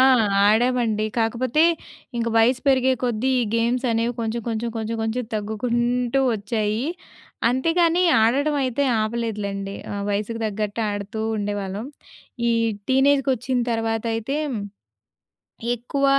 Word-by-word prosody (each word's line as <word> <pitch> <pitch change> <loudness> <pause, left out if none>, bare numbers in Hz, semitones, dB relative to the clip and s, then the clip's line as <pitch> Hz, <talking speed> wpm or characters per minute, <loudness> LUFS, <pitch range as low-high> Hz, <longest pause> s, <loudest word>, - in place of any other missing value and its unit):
ఆ! - - +7 0.4
ఆడామండి. 225 0 +2
కాకపోతే 240 +6 +1 0.5
ఇంక 230 0 0
వయసు 240 +3 +4
పెరిగే 260 -1 +4
కొద్దీ 240 +1 0
ఈ - - +2
గేమ్స్ 240 +3 +1
అనేవి 230 +1 +1
కొంచెం 230 +1 -2
కొంచెం, 230 +1 -2
కొంచెం 225 +1 -3
కొంచెం 225 +3 -1
తగ్గుకుంటూ 240 +4 0
వచ్చాయి. 215 +2 -1 0.6
అంతేగాని 330 +7 +2 0.2
ఆడడమైతే 280 +2 +1 0.2
ఆపలేదులెండి. 210 -3 -3 0.2
ఆ! - - -3 0.2
వయసుకు 210 +3 -2
తగ్గట్టు 210 +1 -2
ఆడుతూ 205 +1 -4 0.2
ఉండేవాళ్ళం. 205 +1 -3 0.6
ఈ - - +3 0.4
టీనేజ్‌కొచ్చిన 265 -2 +2
తర్వాతయితే 225 +3 -1 1.4
ఎక్కువ 260 +4 -1
230 Hz, 105 wpm, -23 LUFS, 215-255 Hz, 1.4 s, ఆ